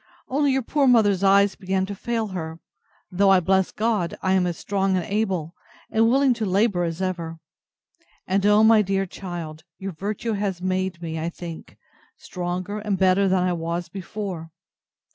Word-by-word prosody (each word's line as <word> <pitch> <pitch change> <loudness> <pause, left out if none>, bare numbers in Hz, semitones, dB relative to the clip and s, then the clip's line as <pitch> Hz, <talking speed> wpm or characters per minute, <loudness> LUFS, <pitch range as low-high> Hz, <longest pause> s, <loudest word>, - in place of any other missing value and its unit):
Only 280 +1 +2
your 265 -1 0
poor 280 +3 +1
mother's 205 -6 +4
eyes 200 0 +5
begin 190 -1 -1
to 200 - -5
fail 225 +1 -2
her; 165 -3 -5 0.5
though, 195 +2 +3
I 190 -1 +6
bless 190 +1 +2
God, 215 -6 -1
I 190 - +1
am 185 -1 +2
as 170 -2 -3
strong 195 -1 0
and 175 - -2
able, 190 -6 -1 0.4
and 225 +1 +3
willing 270 +1 +4
to - - +2
labour 195 -2 +2
as 165 +2 -3
ever; 170 -3 -3 0.9
and, 195 +1 0
O 210 +1 +5
my 220 -1 +6
dear 195 -1 0
child! 170 -4 -7
your 195 0 -5
virtue 205 +6 -3
has 200 -3 -2
made 185 -1 -2
me, 160 -1 -4
I 165 +2 -2
think, 170 -1 -9 0.4
stronger 180 +3 -4
and 210 -2 -1
better 190 +1 +3
than 185 -1 +2
I 180 -1 +1
was 170 +1 -3
before. 190 -4 -6
190 Hz, 175 wpm, -24 LUFS, 175-205 Hz, 0.9 s, I